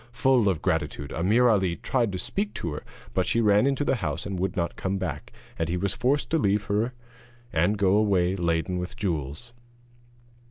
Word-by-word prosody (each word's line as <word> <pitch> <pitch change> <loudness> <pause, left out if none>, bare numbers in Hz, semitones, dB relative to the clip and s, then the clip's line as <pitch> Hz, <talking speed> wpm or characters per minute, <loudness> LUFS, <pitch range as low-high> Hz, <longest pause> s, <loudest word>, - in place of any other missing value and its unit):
Full 120 -3 +3
of 85 -5 -2
gratitude, 75 -5 -1
Ameer 105 +9 +3
Ali 95 -6 +2
tried 120 0 0
to 95 - -3
speak 200 - -3
to 85 - -3
her, 75 - -6 0.3
but 95 -1 +1
she 115 - +2
ran 105 +2 +4
into 140 +1 0
the 135 - +1
house - - -3
and 100 -3 -4
would 95 -1 -2
not 85 -1 -1
come 95 +1 -2
back, 75 -6 -5 0.3
and 80 0 0
he 90 - 0
was 95 +1 -1
forced 135 +4 0
to 165 - +3
leave 105 -4 +2
her 110 +5 0 0.6
and 85 +6 +2
go 100 0 +3
away 95 -4 +2
laden 85 0 0
with 90 +1 -3
the 115 - -14
jewels. 85 - -4
95 Hz, 200 wpm, -26 LUFS, 85-115 Hz, 0.6 s, ran